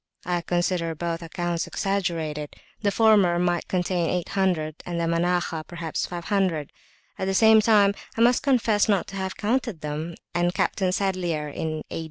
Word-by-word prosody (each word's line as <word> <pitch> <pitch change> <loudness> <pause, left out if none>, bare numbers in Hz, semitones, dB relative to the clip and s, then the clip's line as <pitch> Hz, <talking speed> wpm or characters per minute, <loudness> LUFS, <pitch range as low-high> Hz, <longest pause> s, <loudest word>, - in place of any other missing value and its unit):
I 175 0 0
consider 175 -1 -1
both 170 +1 -3
accounts 170 0 -3
exaggerated; 165 -7 -2 0.3
the 205 - +2
former 200 -5 +4
might 175 -1 0
contain 180 -2 0
800, 180 -4 -1
and 170 -1 -4
the - - 0
Manakhah 170 -1 0
perhaps 170 -2 -3
500; 175 -3 -1 0.5
at 190 - -1
the 195 0 0
same 220 +1 +7
time 205 -2 +4 0.2
I - - +1
must 240 +1 +5
confess 225 -6 +2
not 200 -3 +2
to 195 - -9
have 190 0 -4
counted 225 -5 -1
them, 155 +3 -4 0.2
and 175 +1 +1
Captain 185 -2 +1
Sadlier 180 -6 -1
(in 155 +1 -4
A. - - -3
175 Hz, 160 wpm, -25 LUFS, 165-195 Hz, 0.5 s, same